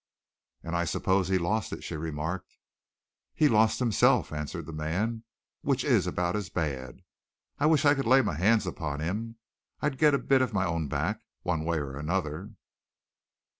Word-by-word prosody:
"And 85 +1 -4
I 85 - +1
suppose 95 +3 +1
he'd 95 -1 +1
lost 105 +5 -1
it," - - -6
she - - -5
remarked. 80 +4 -4 0.8
"He's 150 -2 +4
lost 110 0 +4
himself," 120 -9 +3
answered 75 +2 -4
the 80 - -8
man, 100 +10 -2 0.4
"which - - 0
is - - +3
about 90 +1 -1
as 100 -3 -3
bad. 70 -8 -4 0.6
I 145 - +3
wish 155 -1 +3
I 145 - +7
could 135 -5 -2
lay 130 +2 +6
my 105 - -1
hands 105 +7 +3
upon 75 -5 -4
him. 105 +8 -3 0.4
I'd 150 -3 -1
get 150 -2 +5
a - - +3
bit 135 -1 +2
of 130 - 0
my 95 -2 +1
own 85 -3 -1
back, 85 +10 -2 0.2
one 80 -3 -1
way 85 0 0
or 70 -3 -4
another." 85 +5 -3
90 Hz, 175 wpm, -28 LUFS, 80-115 Hz, 0.8 s, I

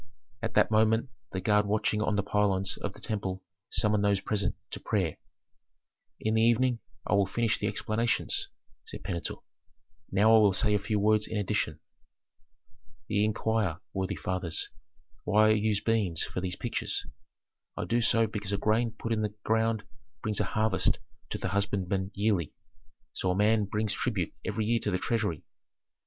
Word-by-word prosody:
At 115 - -3
that - - +4
moment 110 +3 +3 0.2
the 95 - -2
guard 105 +2 +3
watching 105 0 +1
on 105 -1 +1
the 100 - +1
pylons 100 -1 +1
of 100 - -4
the - - -14
temple 95 -4 -3 0.3
summoned 105 -1 +2
those 100 -1 +3
present 100 -2 -1 0.2
to - - -5
prayer. 95 -8 -1 1.0
"In 110 - 0
the 110 - +3
evening 120 +1 +3 0.3
I - - 0
will 100 -1 +4
finish 115 +1 0
the - - 0
explanations," 115 +2 0 0.4
said - - -9
Pentuer; 85 -4 -4 0.7
"now 110 +4 +5
I - - +8
will 105 -3 +5
say 105 +2 +2
a 105 - +3
few 105 +1 -1
words 105 +1 +3
in 110 - -3
addition. 100 -3 -1 1.3
"Ye 105 -1 +2
inquire, 110 -5 0
worthy 95 -1 -1
fathers, 90 -4 -2 0.5
why 110 +1 +4
I - - +6
use 105 -1 +2
beans 105 -8 +1
for 90 - -4
these 90 -1 -2
pictures. 120 - -2 0.7
I - - -2
do 120 +1 +1
so 115 0 +4
because 105 -2 -4
a 100 - +1
grain 110 +3 +1
put 115 - -2
in 110 - 0
the 105 -1 -2
ground 110 -1 +1 0.4
brings 105 -1 -1
a 105 - +2
harvest 105 0 +1 0.3
to - - -3
the - - -3
husbandmen 100 -1 0
yearly; 100 -6 +1 0.6
so 95 - -1
a 90 - +2
man 105 +1 +3
brings 105 +1 -1
tribute 105 -6 -1
every 110 - -1
year 115 +1 +2
to 105 - -2
the 90 - +1
treasury. 105 -7 -1
105 Hz, 170 wpm, -29 LUFS, 100-110 Hz, 1.3 s, I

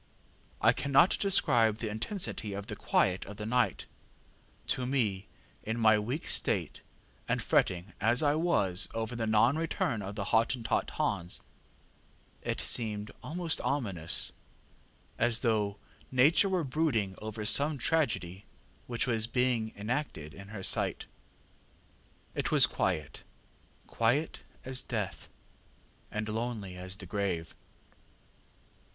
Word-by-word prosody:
I - - +5
cannot 140 +5 +4
describe 125 - +3
the 115 - -4
intensity 110 - -3
of 100 0 -5
the 105 -1 -6
quiet 95 -1 +1
of 105 0 -9
the 105 - -5
night: 125 +2 +1 0.8
to 125 -1 0
me 105 -8 0 0.3
in 110 +2 -3
my 110 -1 +5
weak 125 +9 -3
state, - - 0 0.5
and - - +1
fretting 90 +1 +1
as 115 +6 +4
I 145 -1 +4
was 110 - +3
over 115 +1 -3
the 115 -1 -2
non 115 +7 +3
return 140 -8 -1
of 100 +1 -6
the 105 - -3
Hottentot 115 +1 +1
Hans, 85 +1 -1 1.0
it - - -3
seemed 105 -3 0
almost 165 +1 -2
ominous 100 - 0 0.9
as 120 0 +3
though 105 -4 +1 0.3
Nature 150 - +4
were 185 -3 +1
brooding 130 -9 0
over 110 0 -5
some 145 +6 +4
tragedy 110 - -1 0.4
which 120 -2 0
was 115 -3 +1
being 120 -2 0
enacted 105 - -4
in 100 +3 -11
her 100 -2 -8
sight. - - +2 1.3
ŌĆ£It - - -1
was - - +7
quiet 75 -2 -2 0.6
quiet 125 +8 0 0.2
as 130 0 -1
death, - - -4 0.8
and 110 0 -3
lonely 110 -4 -4
as 90 +1 -6
the 95 - -9
grave. 90 -4 -2
110 Hz, 125 wpm, -30 LUFS, 100-130 Hz, 1.3 s, was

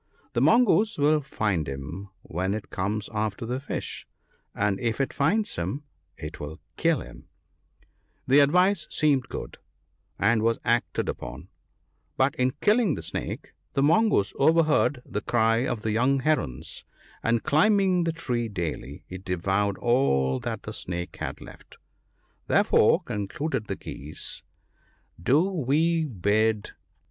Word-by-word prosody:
The - - +1
Mongoose 225 -2 +4
will 150 +1 +3
find 100 - -1
him 75 +9 -6
when 95 +4 -2
it 110 - -7
comes 100 +2 -2
after 110 0 -2
the 125 +3 -2
fish, 140 - -5 0.5
and 100 -1 0
if 115 0 -1
it 135 - 0
finds 210 +10 +1
him 145 +2 -3 0.3
it 75 -1 -7
will 75 +2 -7 0.2
kill - - +2
him/ - - -12 1.0
The 135 +3 +5
advice 180 +5 +4
seemed 140 -4 +1
good, - - -7 0.6
and 115 -2 +3
was 115 +1 +2
acted 120 0 +1
upon; - - -6 0.7
but 135 +1 +3
in 125 0 +1
killing 210 - +3
the - - -7
Snake - - -5 0.2
the 135 - +2
Mongoose 160 - +3
overheard 155 -3 +3
the 105 - -4
cry 115 +1 +2
of 110 - -3
the 110 - 0
young 130 +5 +2
Herons; 80 - -1 0.4
and 115 0 +1
climbing 190 +2 +3
the 165 - +1
tree 125 -8 -2
daily, 80 - -5
he 95 - -7
devoured 95 +2 0
all 70 - +2
that - - -4
the - - -6
Snake 90 0 -5
had - - -5
left. - - -14 0.7
Therefore," - - +4
concluded 105 +4 -3
the - - -2
Geese, 75 +2 -5 0.4
" - - -26
do 140 - +4
we 165 -2 +1
bid 110 - +1
PEACE. - - -9
120 Hz, 140 wpm, -26 LUFS, 100-150 Hz, 1.0 s, The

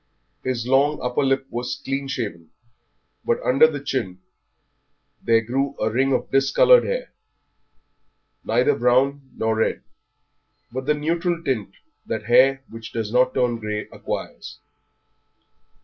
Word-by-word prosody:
His 125 -2 -2
long 140 +4 +2
upper 125 0 0
lip 135 -1 +1
was 120 +1 -4
clean 135 0 -2
shaven, 105 -11 -5 0.7
but - - 0
under 150 +5 +5
his 145 -1 -7
chin 95 -9 -2 1.0
there 115 -1 +3
grew 135 +5 -2
a 110 - 0
ring 135 +4 +1
of 130 - -1
discoloured 135 - +5
hair, - - -3 1.3
neither 440 - +2
brown 135 +2 +1
nor 110 0 0
red, 110 - 0 0.9
but 130 +2 -5
the 150 - +3
neutral 170 +3 -1
tint 120 -9 -2 0.3
that 110 -1 -3
hair 135 +3 +4
which 115 -1 -10
does 110 -1 -3
not 125 +1 +3
turn 125 -2 +1
grey 105 -1 -4
acquires. - - -6
130 Hz, 130 wpm, -22 LUFS, 115-140 Hz, 1.3 s, under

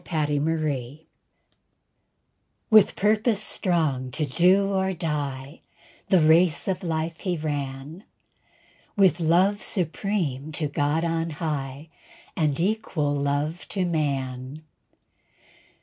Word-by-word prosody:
A 155 -3 +1
TRUE 145 -1 0
MAN 150 -4 -2 1.7
With 215 -2 +6
purpose 215 +1 +2
strong 160 - -1
to 150 +5 -2
do 185 +7 +3
or 190 0 0
die, 145 -4 -4 0.5
The 190 - +5
race 160 +1 +4
of 190 -2 -1
life 165 -1 -3
he 180 -3 -2
ran, 145 +3 -5 0.9
With 185 -4 +4
love 180 +5 +3
supreme 165 -5 -2
to 150 0 -1
God 145 +3 0
on 165 0 -1
high, 150 -2 -4 0.5
And 150 -3 0
equal 180 -6 0
love 145 +4 -2
to 190 -2 -1
man. 140 -3 -3
160 Hz, 105 wpm, -25 LUFS, 145-180 Hz, 1.7 s, With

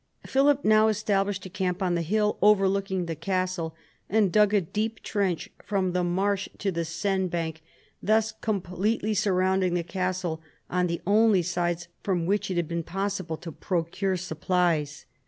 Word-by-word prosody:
Philip 280 +1 +3
now 215 0 +5
established 205 -2 0
a - - -6
camp 185 -1 -1
on 180 -1 +1
the 170 - +1
hill 210 +5 +1
overlooking 195 -2 +3
the 165 - -3
castle, 180 -1 -2 0.3
and 205 -2 +3
dug 210 0 +4
a 210 - +4
deep 215 +5 -3
trench 195 -5 -1
from 190 -2 0
the 180 0 0
marsh 195 +3 0
to 200 - -1
the 170 -1 -2
Seine 190 +3 -1
bank, 165 -2 -3 0.4
thus 220 +1 +2
com 215 -2 -2
pletely 210 +4 -1
surrounding 190 -2 +2
the 175 - 0
castle 180 -2 -2 0.3
on 180 0 +2
the 170 0 -3
only 205 -1 +4
sides 175 0 -1
from 180 -4 0
which 200 +3 0
it 185 - -2
had 170 -2 0
been 170 +1 -2
possible 185 -1 -3
to 165 - -8
procure 185 +3 -1
supplies. 170 -3 0
185 Hz, 165 wpm, -27 LUFS, 175-205 Hz, 0.4 s, now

